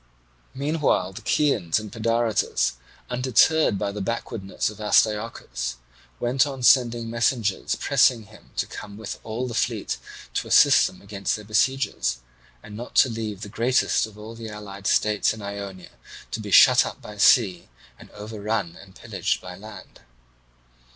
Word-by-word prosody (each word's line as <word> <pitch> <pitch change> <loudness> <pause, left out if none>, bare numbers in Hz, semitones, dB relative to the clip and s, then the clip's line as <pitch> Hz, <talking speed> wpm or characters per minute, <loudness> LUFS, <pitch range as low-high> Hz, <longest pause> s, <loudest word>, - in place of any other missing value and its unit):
Meanwhile 140 - 0
the - - -9
Chians 110 - +1
and 105 -2 -9
Pedaritus, 115 0 0 0.4
undeterred 125 +1 +3
by 100 - -2
the 105 0 -6
backwardness 100 -2 -3
of 105 - -14
Astyochus, 105 - 0 0.4
went 130 +4 +2
on 135 -3 -6
sending 120 -2 +4
messengers 115 -3 0
pressing 115 -3 +3
him 105 +1 -18
to - - 0
come 100 0 -9
with 110 -2 -7
all 115 +3 -4
the 120 - -6
fleet - - -1 0.3
to - - -2
assist - - +6
them - - -12
against 100 -1 -2
their 105 - -9
besiegers, 110 - 0 0.5
and 105 - -10
not 120 +3 -8
to 130 - +6
leave 110 -3 -5
the 105 - -6
greatest 120 +3 +1
of 110 - -15
the 110 +1 -9
allied 100 -1 -7
states 105 +1 +2
in 110 - -10
Ionia 100 -2 -7 0.4
to - - -3
be - - -6
shut - - +7
up - - -7
by 105 0 -11
sea 100 -4 +4 0.3
and - - -14
overrun 105 -3 -4
and 95 -1 -17
pillaged - - -2
by 90 -1 -9
land. 105 0 -12
110 Hz, 150 wpm, -24 LUFS, 100-120 Hz, 0.5 s, shut